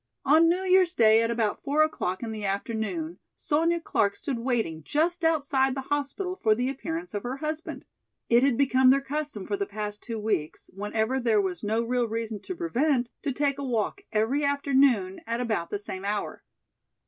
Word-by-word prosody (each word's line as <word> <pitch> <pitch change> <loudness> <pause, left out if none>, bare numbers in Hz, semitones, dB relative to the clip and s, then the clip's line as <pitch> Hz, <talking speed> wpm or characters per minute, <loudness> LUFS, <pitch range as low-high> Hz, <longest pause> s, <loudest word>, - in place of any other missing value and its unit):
On 315 +4 +6
New 360 +2 +1
Year's 370 -1 +4
day 220 0 +6
at 230 - 0
about 225 -3 -1
four 295 +2 +3
o'clock 190 -11 -2
in 225 - -4
the 215 -1 -6
afternoon 225 - -3 0.2
Sonya 330 +3 +1
Clark 200 -10 +1
stood 275 -7 -4
waiting 230 -10 -1
just 335 - 0
outside 280 -5 +2
the 270 - -3
hospital 365 +6 -3
for 215 -1 +4
the 250 +3 -1
appearance 325 +6 -5
of 205 - -2
her 250 +4 -4
husband. 310 +2 -5 0.4
It 235 +1 +5
had 265 -3 +3
become 260 -2 +4
their 275 +1 +5
custom 280 -6 -4
for 200 - -2
the 200 - -2
past 210 0 -5
two 230 -2 -5
weeks, 210 -8 -3
whenever 220 +6 -1
there 230 -4 +2
was 185 -3 -2
no 220 +2 0
real 245 0 0
reason 225 -1 -3
to 370 - -6
prevent, 285 -7 0
to 285 - -1
take 280 +1 0
a - - -3
walk 245 - -1
every 230 +7 +1
afternoon 270 -9 +2
at 230 +1 -1
about 215 -9 -1
the - - -2
same 195 -2 -7
hour. 205 +1 -3
250 Hz, 190 wpm, -27 LUFS, 215-295 Hz, 0.4 s, On